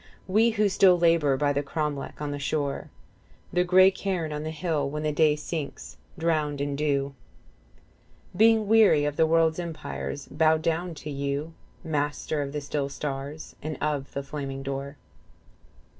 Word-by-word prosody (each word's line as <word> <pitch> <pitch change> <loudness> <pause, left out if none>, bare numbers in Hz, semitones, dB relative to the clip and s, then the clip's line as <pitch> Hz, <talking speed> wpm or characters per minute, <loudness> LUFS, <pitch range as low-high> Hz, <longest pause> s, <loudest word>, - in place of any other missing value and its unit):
We 215 +5 +3
who 215 -2 +2
still 185 -2 +5
labour 165 -5 +3
by 145 +1 +1
the 140 - 0
cromlec 145 -1 -3
on 150 -1 -3
the 145 - -4
shore, 140 0 -2 0.6
The 180 - +3
grey 185 +1 +6
cairn 185 -5 -3
on 150 - -3
the 155 - -4
hill, 160 -3 -1
when 150 +2 -4
day 150 0 +4
sinks 150 -2 -6 0.2
drowned 155 -3 0
in 140 0 -1
dew, 140 -1 0 1.2
35 - - -11
Being 220 -1 +5
weary 210 -9 +5
of 145 -1 -1
the 160 +1 +3
world's 165 0 +3
empires, 160 -4 -5
bow 160 +2 +3
down 165 +2 -2
to 150 +1 -7
you 140 +3 -3 0.3
Master 150 0 -1
of 140 -1 -4
the 150 0 -3
still 140 0 -2
stars 140 +2 -6
and 155 0 -4
of 145 -2 -2
the 140 - -3
flaming 135 -1 -5
door. 140 +1 -5
150 Hz, 160 wpm, -26 LUFS, 140-165 Hz, 1.2 s, grey